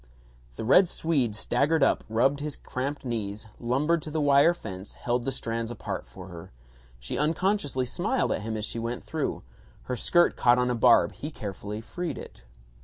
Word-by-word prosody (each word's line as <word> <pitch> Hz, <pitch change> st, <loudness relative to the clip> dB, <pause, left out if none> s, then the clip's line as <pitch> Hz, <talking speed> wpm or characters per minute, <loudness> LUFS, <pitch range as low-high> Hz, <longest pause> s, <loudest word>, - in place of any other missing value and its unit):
The -, -, -5 dB
Red 175 Hz, -, +6 dB
Swede 135 Hz, -10 st, 0 dB
staggered 140 Hz, +7 st, +2 dB
up, -, -, +3 dB
rubbed 135 Hz, +6 st, +2 dB
his 150 Hz, -1 st, -3 dB
cramped 140 Hz, +2 st, -4 dB
knees, 110 Hz, -3 st, -3 dB
lumbered 145 Hz, +8 st, +1 dB
to 155 Hz, -, -6 dB
the 155 Hz, +1 st, -2 dB
wire 145 Hz, +3 st, +5 dB
fence, 95 Hz, -, -8 dB
held 120 Hz, 0 st, -1 dB
the 135 Hz, -, 0 dB
strands 115 Hz, -3 st, -3 dB
apart 120 Hz, -, -5 dB
for 90 Hz, +10 st, -11 dB
her. 85 Hz, -2 st, -10 dB, 0.5 s
She -, -, -3 dB
unconsciously 155 Hz, -3 st, +1 dB
smiled 205 Hz, -, 0 dB
at -, -, -1 dB
him 110 Hz, +1 st, -3 dB
as 105 Hz, -, -3 dB
she 115 Hz, -, -4 dB
went 115 Hz, +1 st, -3 dB
through. -, -, -3 dB, 0.4 s
Her 125 Hz, -, -3 dB
skirt 175 Hz, +8 st, +3 dB
caught 120 Hz, 0 st, +4 dB
on 125 Hz, 0 st, +2 dB
a -, -, +1 dB
barb; 120 Hz, +1 st, +5 dB
he 150 Hz, -, -6 dB
carefully 105 Hz, -4 st, -6 dB
freed 170 Hz, +5 st, -4 dB
it. -, -, -10 dB
125 Hz, 180 wpm, -27 LUFS, 110-150 Hz, 0.5 s, Red